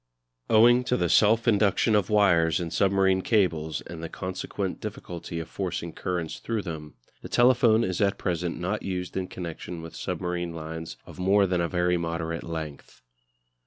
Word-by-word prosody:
Owing 120 +3 +6
to 125 - +1
the 85 - 0
self 110 +6 +4
induction 105 0 +3
of 105 -3 +2
wires 90 -6 +4
in 85 -2 -4
submarine 95 -1 +3
cables 80 -8 +1
and 85 -1 -9
the 85 - -5
consequent 95 +1 -4
difficulty 85 -5 -6
of 80 - -5
forcing 85 -3 -4
currents 90 -3 -3
through 115 -3 -2
them, 75 -4 -7 0.3
the - - -8
telephone 120 -2 +4
is 95 +1 -2
at 100 -1 +2
present 85 -2 -2
not 95 +5 -2
used 90 -1 -4
in 95 -1 -2
connection 85 -1 -7
with 80 - -9
submarine 90 -1 -3
lines 80 -3 -6
of - - -12
more 100 +2 +4
than 90 -2 0
a 85 - -1
very 90 0 +1
moderate 85 -1 -3
length. 80 -3 -7
90 Hz, 165 wpm, -26 LUFS, 85-100 Hz, 0.3 s, Owing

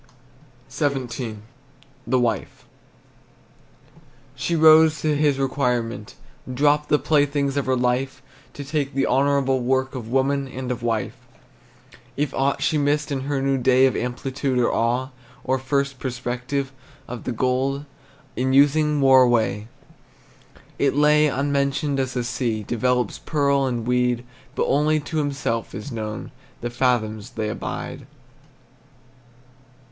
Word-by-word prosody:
XVII. 125 -5 -2 0.7
THE 130 +2 +2
WIFE. 115 -4 -2 1.7
She 170 - -2
rose 160 0 +6
to 155 -1 +1
his 145 -2 +2
requirement, 125 -5 -1 0.4
dropped 145 +3 +2
The 150 - +4
playthings 145 -1 +1
of 140 -2 -1
her 130 - +2
life 130 +2 -1 0.3
To 145 - -6
take 140 -1 -2
the 135 - +2
honorable 135 0 +2
work 130 +1 0
Of 125 -4 -6
woman 135 +2 +1
and 130 -1 -5
of 120 -1 -4
wife. 115 -2 -1 1.0
If 145 0 -1
aught 135 +1 0
she 155 - +1
missed 145 +1 0
in 135 -2 -1
her 140 -2 -1
new 135 -1 +1
day 130 +1 +4
Of 130 - +1
amplitude, 130 +2 -2
or 120 - +2
awe, 125 +3 0 0.3
Or 130 +1 0
first 140 0 -1
prospective, 125 +2 -3 0.4
or 125 - -5
the 125 - -5
gold 130 +4 -1 0.5
In 130 +1 0
using 145 +1 +4
wore 135 -1 +7
away, 110 -4 +2 1.1
It 140 -1 +2
lay 150 +1 +4
unmentioned, 140 0 0
as 130 -1 -2
the 125 - 0
sea 115 -2 -2
Develops 125 +1 0
pearl 140 -3 +1
and 120 -3 -2
weed, 125 0 +1 0.3
But - - +1
only 150 +2 +2
to 155 +2 -5
himself 135 -8 -2
is 105 +7 -7
known 110 -2 -5 0.3
The 120 - -3
fathoms 115 -4 0
they 110 -1 -3
abide. - - -6
130 Hz, 130 wpm, -23 LUFS, 125-140 Hz, 1.7 s, wore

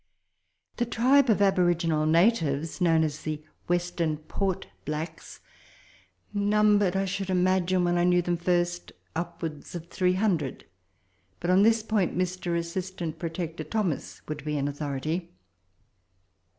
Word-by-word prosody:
The 240 - 0
tribe 260 +3 +4
of 205 -2 +4
aboriginal 175 -5 +2
natives, 165 -3 +2
known 165 -2 +4
as 150 -1 -2
the 155 -1 -4 0.2
Western 175 -3 0
Port 185 +4 -2 0.2
blacks, 155 +2 -6 0.9
numbered, 205 -2 +3
I 195 0 +1
should 195 0 -3
imagine, 185 0 +2
when 175 0 +2
I - - +3
knew 180 0 +3
them 175 0 0
first, 175 0 -1 0.2
upwards 165 -2 -5
of 170 0 -7
300; 185 -5 0 0.7
but, 175 - 0
on 185 +2 +5
this 225 +1 +4
point, 210 -6 0
Mr. 180 -1 -1
Assistant 170 -1 -4
Protector 165 0 -4
Thomas 205 -9 -2
would 150 -2 -5
be 150 0 -2
an 140 0 0
authority. 145 +4 -3
175 Hz, 125 wpm, -27 LUFS, 160-190 Hz, 0.9 s, on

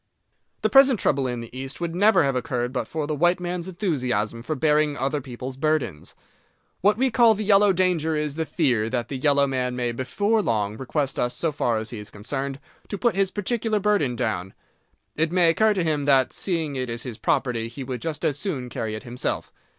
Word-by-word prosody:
The - - +3
present 270 -4 +6
trouble 135 -2 +1
in 120 -1 -3
the 115 +1 -10
East 135 +2 -5
would 170 -1 -3
never 200 +2 +4
have 135 -1 0
occurred 125 -2 -2
but 130 - -2
for 155 -2 -3
the 155 - -2
white 175 +4 +2
man's 175 0 -3
enthusiasm 125 - -1
for 155 +6 -3
bearing 150 0 +2
other 140 +2 -1
people's 130 0 -7
burdens. 140 - -1 0.7
What 205 +3 +4
we 260 +1 +2
call 230 -2 +5
the 215 - -3
yellow 205 0 +5
danger 175 -4 +1
is 150 -1 -1
the 160 +1 -3
fear 120 -9 +1
that 120 -1 -2
the 140 - -4
yellow 140 +1 +3
man 130 -2 -2
may 120 -1 -1
before 200 - 0
long 105 - -1
request 135 +3 -2
us, 120 0 0
so 165 - 0
far 120 -5 0
as 110 +2 -4
he 115 - -6
is 105 0 -9
concerned, 135 +6 -4 0.3
to 205 - -4
put 240 +1 +1
his 195 -1 +2
particular 215 +1 -1
burden 195 -12 +1
down. 105 -6 -3 0.6
It 160 +1 0
may 175 -2 +5
occur 215 +4 +3
to 185 - +1
him 150 -3 0
that, 135 -3 +3
seeing 165 -6 -2
it 130 -2 -2
is 115 -1 -4
his 120 -4 -7
property, 125 -5 0
he 120 +4 -7
would 125 -2 -5
just 155 -3 -3
as 145 -1 0
soon 135 -11 -3
carry 110 -2 -4
it 110 - -7
himself. 125 0 -3
145 Hz, 210 wpm, -24 LUFS, 125-175 Hz, 0.7 s, present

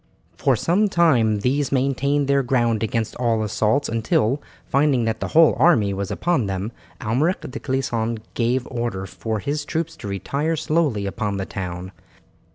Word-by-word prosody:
For - - +2
some 200 +5 +2
time 120 - +3
these 140 +5 0
maintained 140 +1 +1
their 140 0 +3
ground 120 -4 +1
against 110 0 -1
all 115 -3 +1
assaults 110 +6 +1
until, 115 +3 +1 0.2
finding 140 -3 +2
that 110 -1 -1
the - - -2
whole 165 -2 +7
army 115 - +4
was 100 0 -3
upon 130 - 0
them, 95 +3 -3 0.3
Almeric 140 - 0
de 140 - -6
Clisson 120 -4 -1 0.2
gave 120 +2 0
order 115 -6 -3
for 110 +4 -4
his 145 +6 -2
troop 165 +2 -2
to 135 - -10
retire 140 +11 -1
slowly 150 -10 0
upon 100 0 -2
the 95 - -3
town. 90 -1 -5
120 Hz, 160 wpm, -22 LUFS, 110-145 Hz, 0.3 s, whole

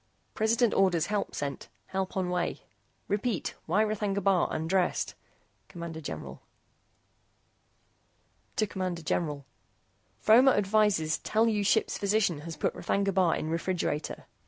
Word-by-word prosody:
PRESIDENT 225 +1 +2
ORDERS 175 -4 +3
HELP 205 +1 -2
SENT. 140 -1 -4 0.2
HELP 190 0 -3
ON 180 -1 0
WAY. 180 -1 -2 0.4
REPEAT. 210 0 -1
WHY 195 +7 +3
R'THAGNA 210 -2 -1
BAR 190 -2 +3
UNDRESSED? 175 +3 0 0.6
CMD 170 -2 -7
GENERAL 145 - -7 2.2
CMD 185 -5 -2
GENERAL 150 -4 -1 0.7
FROMER 250 +5 +6
ADVISES 205 -6 +2
TELL 220 +1 +2
YOU 210 -2 0
SHIPS 220 +2 +2
PHYSICIAN 200 -5 +1
HAS 160 +1 -7
PUT - - 0
R'THAGNA 200 0 0
BAR 180 -3 +3
IN 155 - -3
REFRIGERATOR. 165 -3 -2
190 Hz, 115 wpm, -29 LUFS, 170-210 Hz, 2.2 s, FROMER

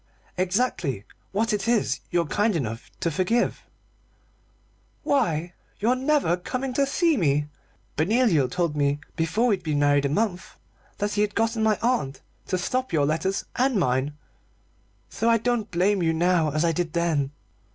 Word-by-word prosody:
"Exactly 180 - -1 0.3
what 215 +3 0
it 210 +2 -1
is 235 -2 +1
you're 175 -2 +1
kind 205 +8 +1
enough 115 -7 -4
to 170 - 0
forgive." 190 +9 0 1.4
"Why 175 - 0 0.3
your 235 +5 +2
never 265 - +1
coming 255 +8 -4
to 275 +2 +2
see 325 +2 +2
me. 150 -5 +1 0.5
Benoliel 170 - +3
told 170 -2 -1
me 145 0 +1 0.2
before 180 +8 +1
we'd 205 -6 +2
been 155 -4 -1
married 145 -1 +3
a - - +1
month 180 +2 -2 0.4
that 205 0 -1
he 205 - +1
had 210 -1 0
got 225 +1 +1
my 220 -1 +2
aunt 190 - 0 0.3
to 185 - 0
stop 250 +7 -2
your 150 -4 +2
letters 165 +6 -1
and 260 0 +2
mine, 135 0 0 0.9
so 230 - -1
I 230 - +5
don't 230 -1 -1
blame 190 +3 +1
you 165 -1 +2
now 170 -1 +2
as 155 +3 0
I 165 - +3
did 165 -1 -2
then. 165 -5 +1
180 Hz, 160 wpm, -25 LUFS, 155-230 Hz, 1.4 s, I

